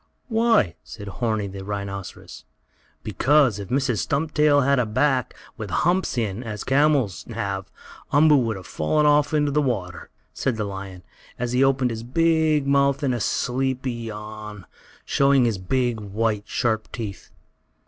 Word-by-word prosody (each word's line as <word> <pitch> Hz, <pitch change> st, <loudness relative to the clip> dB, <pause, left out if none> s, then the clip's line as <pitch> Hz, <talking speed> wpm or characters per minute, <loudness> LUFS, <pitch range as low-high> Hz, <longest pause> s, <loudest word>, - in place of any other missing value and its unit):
"Why?" 225 Hz, -, +2 dB
asked -, -, -11 dB
Horni, 110 Hz, +1 st, -2 dB
the 95 Hz, 0 st, -7 dB
rhinoceros. 100 Hz, -2 st, -6 dB, 0.6 s
"Because, 135 Hz, -7 st, +3 dB
if 100 Hz, -, -6 dB
Mrs. 130 Hz, -4 st, 0 dB
Stumptail 150 Hz, 0 st, +2 dB
had 140 Hz, -1 st, +3 dB
a 120 Hz, -, +1 dB
back, 130 Hz, +3 st, +1 dB, 0.2 s
with -, -, -6 dB
humps 175 Hz, -4 st, +1 dB
in, 110 Hz, -2 st, -1 dB
as 110 Hz, -4 st, -6 dB
the -, -, -6 dB
camels 140 Hz, -, +2 dB
have, 100 Hz, -4 st, -4 dB, 0.4 s
Umboo 150 Hz, +1 st, +6 dB
would 115 Hz, -4 st, 0 dB
have 95 Hz, -2 st, -9 dB
fallen 150 Hz, -, 0 dB
off 150 Hz, 0 st, +4 dB
into 145 Hz, -2 st, +1 dB
the 150 Hz, +2 st, +2 dB
water," 100 Hz, -10 st, -3 dB, 0.2 s
said 130 Hz, -4 st, -1 dB
the 110 Hz, -, -1 dB
lion, 95 Hz, -2 st, -7 dB, 0.3 s
as 120 Hz, 0 st, -2 dB
he 125 Hz, +2 st, +3 dB
opened 135 Hz, -2 st, +2 dB
his 110 Hz, -1 st, -5 dB
big 160 Hz, +3 st, +2 dB
mouth 140 Hz, +1 st, +2 dB
in 130 Hz, -3 st, +1 dB
a 120 Hz, -, -2 dB
sleepy 130 Hz, +3 st, -1 dB
yawn, 105 Hz, -3 st, -8 dB, 0.4 s
showing 140 Hz, -2 st, +3 dB
his 110 Hz, -5 st, 0 dB
big, 120 Hz, +4 st, 0 dB
white, 105 Hz, +1 st, -2 dB
sharp 110 Hz, -3 st, -1 dB
teeth. 105 Hz, -5 st, -7 dB
120 Hz, 155 wpm, -23 LUFS, 105-140 Hz, 0.6 s, Umboo